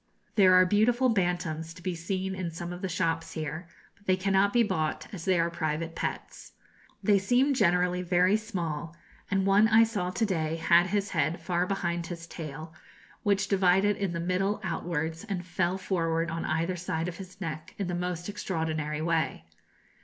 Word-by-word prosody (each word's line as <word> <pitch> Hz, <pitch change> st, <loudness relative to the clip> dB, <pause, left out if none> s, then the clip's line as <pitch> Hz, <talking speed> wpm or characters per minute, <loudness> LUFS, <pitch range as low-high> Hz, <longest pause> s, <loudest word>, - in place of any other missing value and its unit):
There 185 Hz, -3 st, +6 dB
are 185 Hz, 0 st, +7 dB
beautiful 235 Hz, +6 st, +3 dB
bantams 175 Hz, -5 st, -1 dB
to 175 Hz, -, -13 dB
be 185 Hz, -, -1 dB
seen 185 Hz, +3 st, -3 dB
in 185 Hz, -2 st, -3 dB
some 170 Hz, +2 st, -6 dB
of 180 Hz, -, -8 dB
the 190 Hz, -, -2 dB
shops 165 Hz, -2 st, -1 dB
here; 160 Hz, +2 st, -5 dB, 0.3 s
but 200 Hz, -, -28 dB
they 185 Hz, 0 st, +3 dB
cannot 195 Hz, +1 st, +2 dB
be 240 Hz, +1 st, +4 dB
bought, 155 Hz, -7 st, -1 dB
as 170 Hz, -5 st, -6 dB
they 185 Hz, -2 st, +3 dB
are 170 Hz, +1 st, +1 dB
private 165 Hz, 0 st, -2 dB
pets. -, -, -5 dB, 0.5 s
They 205 Hz, -2 st, +4 dB
seem 250 Hz, +8 st, +3 dB
generally 180 Hz, -5 st, +2 dB
very 180 Hz, +2 st, +3 dB
small, 170 Hz, -7 st, -4 dB, 0.3 s
and 195 Hz, -1 st, +1 dB
one 200 Hz, +2 st, +5 dB
I 220 Hz, +1 st, +6 dB
saw 205 Hz, -6 st, -1 dB
to 220 Hz, +5 st, 0 dB
day 160 Hz, -5 st, -1 dB
had 170 Hz, +2 st, +4 dB
his 205 Hz, +1 st, -1 dB
head 165 Hz, -1 st, 0 dB
far 180 Hz, 0 st, 0 dB
behind 175 Hz, -3 st, -2 dB
his 170 Hz, -1 st, -7 dB
tail, 160 Hz, -1 st, -8 dB, 0.5 s
which 200 Hz, -2 st, +1 dB
divided 195 Hz, +1 st, +3 dB
in 195 Hz, -2 st, -2 dB
the 170 Hz, -, -2 dB
middle 185 Hz, +4 st, 0 dB
outwards, 165 Hz, -2 st, -2 dB
and 190 Hz, -5 st, -4 dB
fell 180 Hz, 0 st, 0 dB
forward 165 Hz, -3 st, -1 dB
on 165 Hz, 0 st, -3 dB
either 165 Hz, +3 st, 0 dB
side 170 Hz, -1 st, -2 dB
of 170 Hz, -1 st, -5 dB
his 185 Hz, 0 st, -11 dB
neck 165 Hz, 0 st, -6 dB
in 200 Hz, -, -2 dB
the 180 Hz, -, -3 dB
most 175 Hz, -1 st, -3 dB
extraordinary 160 Hz, -6 st, -2 dB
way. 165 Hz, -1 st, 0 dB
180 Hz, 185 wpm, -28 LUFS, 165-195 Hz, 0.5 s, are